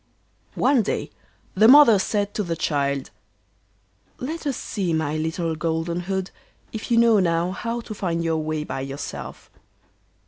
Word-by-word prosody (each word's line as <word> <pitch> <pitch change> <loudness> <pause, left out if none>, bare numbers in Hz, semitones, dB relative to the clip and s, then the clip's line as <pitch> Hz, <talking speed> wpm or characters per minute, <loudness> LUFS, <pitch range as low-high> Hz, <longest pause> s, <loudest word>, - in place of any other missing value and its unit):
One 275 -4 +3
day 210 - -3 0.4
the 215 +3 +5
mother 255 -5 +8
said 205 +1 -1
to - - -1
the 170 -4 -2
child: 140 -4 -1 1.1
'Let 310 +4 -5
us 275 - -1
see, 185 -5 -2
my 160 -1 -1
little 160 +1 -2
Golden 165 +2 -2
hood, 190 +1 -3 0.4
if 220 - -6
you 235 - +3
know 230 -2 +5
now 170 -1 +1
how 230 +4 -4
to 225 - -8
find 170 -5 -2
your 165 -1 0
way 155 0 -2
by 135 - -5
yourself. 135 +1 -7
175 Hz, 150 wpm, -23 LUFS, 160-220 Hz, 1.1 s, mother